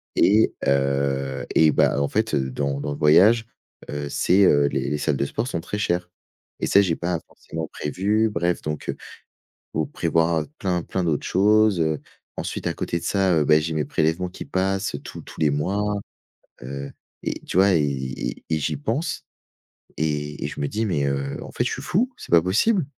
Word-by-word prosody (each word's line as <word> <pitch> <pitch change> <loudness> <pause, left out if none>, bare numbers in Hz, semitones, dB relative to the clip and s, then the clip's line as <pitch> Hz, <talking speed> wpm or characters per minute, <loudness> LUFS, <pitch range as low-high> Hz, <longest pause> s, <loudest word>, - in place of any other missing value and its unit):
et 110 +3 +4
heu 70 0 0
et 80 -1 +6
bah, 70 - +2
en 70 - +1
fait, 110 +8 0
dans 70 +1 -1
dans 75 - -3
le 70 - -4
voyage, 105 +10 +5 0.4
heu, 75 0 -4
c'est, 95 +7 +3
heu, 70 -4 +4
les 65 0 -1
les 75 - -1
salles 75 -2 0
de 70 - 0
sport 120 - -3
sont 125 - -2
très 105 - -4
chères 90 -3 -1 0.5
et - - +1
ça, 100 - +6
j'ai 85 -4 +1
pas 85 0 -2
forcément 80 0 -7
prévu. 105 +8 0
Bref 90 -4 0
donc 75 -1 -5
heu, - - -1 0.6
il - - -10
faut - - 0
prévoir 80 -1 +1
plein, 90 -3 0
plein 95 - -2
d'autres 75 -4 0
choses, 105 -1 +4
heu. 80 -1 0 0.4
Ensuite - - -4
à - - 0
côté 85 - -2
de - - -10
ça, 95 -3 +2
heu, 75 - +2
ben, 75 +1 +5
j'ai 80 +1 -2
mes 75 - 0
prélèvements 80 +4 0
qui 90 - -8
passent 95 +1 -1
tous - - -8
tous - - -12
les 75 - +4
mois, 95 +8 0 0.8
heu 70 +2 -6 0.3
et - - -2
tu - - -4
vois, 95 0 +5
et 80 - +4
et 65 -2 -4
et 80 - +2
j'y 75 +1 -1
pense 115 - -2 0.7
et 75 -1 -2
et - - -1
je - - -7
me 70 - 0
dis: 110 +6 -1
«Mais 75 -8 0
heu, 70 0 -2
en - - -10
fait, - - 0
je - - -1
suis - - -4
fou, 245 +8 0
c'est - - -11
pas 85 -1 +7
possible». 140 - +2
80 Hz, 205 wpm, -23 LUFS, 70-95 Hz, 0.8 s, pas